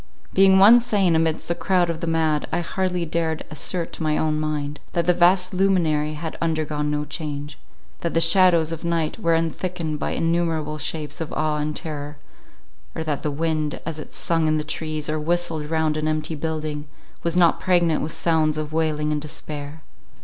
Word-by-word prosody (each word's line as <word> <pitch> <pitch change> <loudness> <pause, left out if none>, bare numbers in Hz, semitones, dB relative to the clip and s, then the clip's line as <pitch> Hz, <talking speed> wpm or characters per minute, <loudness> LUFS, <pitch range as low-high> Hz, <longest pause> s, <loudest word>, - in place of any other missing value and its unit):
Being 190 0 +6
one 215 +5 +8
sane 205 -8 +2
amidst 160 +1 0
a - - +3
crowd 175 -1 +1
of 165 - -6
the 170 - -2
mad, 160 -2 +1
I - - 0
hardly 180 0 -1
dared 160 -1 -1
assert 170 +2 -2
to - - -7
my 155 -1 +1
own 155 -1 0
mind, 150 -1 -3
that 170 -1 0
the 180 - +4
vast 180 +1 +3
luminary 165 -6 +1
had 160 +1 -6
undergone 155 -2 -1
no 150 0 -1
change—that 150 +2 -7
the - - +5
shadows 165 -1 +4
of 165 - -5
night 170 +2 -1
were 165 -5 +2
unthickened 165 -1 -2
by - - -2
innumerable 165 -2 0
shapes 150 +1 -3
of 160 - -4
awe 155 0 0
and 150 0 -2
terror; 150 -2 -5 0.8
or 160 - -2
that 150 -3 -2
the 150 - -1
wind, 155 0 -1
as 160 -1 -4
it - - -9
sung 165 -2 0
in 155 0 +2
the 150 - -1
trees, 155 0 -3
or 155 0 -1
whistled 160 -1 -1
round 160 -1 +1
an 155 0 -1
empty 155 +1 -1
building, 155 -1 -3 0.3
was 170 +1 0
not 170 -2 +4
pregnant 175 -4 +2
with 155 - -3
sounds 155 -2 +1
of 155 0 -4
wailing 155 -2 0
and 150 -1 -1
despair. 150 0 -7
160 Hz, 185 wpm, -23 LUFS, 150-170 Hz, 0.8 s, one